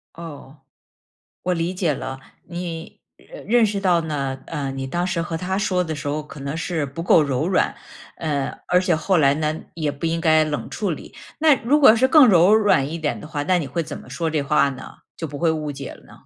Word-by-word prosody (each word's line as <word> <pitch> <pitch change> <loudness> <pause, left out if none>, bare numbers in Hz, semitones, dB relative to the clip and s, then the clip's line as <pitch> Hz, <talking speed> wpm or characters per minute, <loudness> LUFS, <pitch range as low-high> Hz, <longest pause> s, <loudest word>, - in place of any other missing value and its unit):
哦， 150 -4 -10 0.9
我 180 0 0
理 170 +1 -1
解 175 -5 0
了。 130 0 -6 0.3
你， 170 -1 -6 0.2
认 - - -13
认 235 0 +4
识 205 -1 -2
到 180 -3 +3
呢， 140 -4 -3
呃， 140 -2 -3
你 135 0 -4
当 175 +6 -1
时 170 -2 -1
和 165 -1 -4
他 185 +3 -2
说 185 -3 0
的 160 -1 -4
时 145 0 -5
候 150 +1 -2
可 150 -1 -12
能 140 +3 -4
是 165 -2 -2
不 140 +5 -6
够 165 -2 +5
柔 140 +2 -1
软， 185 - +1 0.4
呃， 145 -4 -2
而 180 0 +3
且 180 -3 +1
后 185 +2 +1
来 140 -2 +4
呢， 155 +1 -2
也 155 -3 -1
不 145 +4 -4
应 165 0 -1
该 155 -1 +4
冷 150 -1 -4
处 205 -3 -2
理。 155 - -7 0.2
那 310 -1 +5
如 280 +6 +3
果 265 -6 +8
是 260 +3 +3
更 300 -2 +7
柔 185 +1 +6
软 200 -11 +3
一 165 - -4
点 150 -2 -2
的 - - -9
话， 145 -2 -3
那 180 +1 +2
你 155 - -3
会 155 +6 -2
怎 155 -1 -7
么 - - -14
说 160 +5 -2
这 150 -2 0
话 140 0 +3
呢， 130 -1 -10 0.2
就 165 - -4
不 145 0 -7
会 170 +1 +2
误 155 -2 -2
解 135 -1 -7
了 - - -16
呢？ - - -17
160 Hz, 250 characters per minute, -22 LUFS, 145-180 Hz, 0.9 s, 果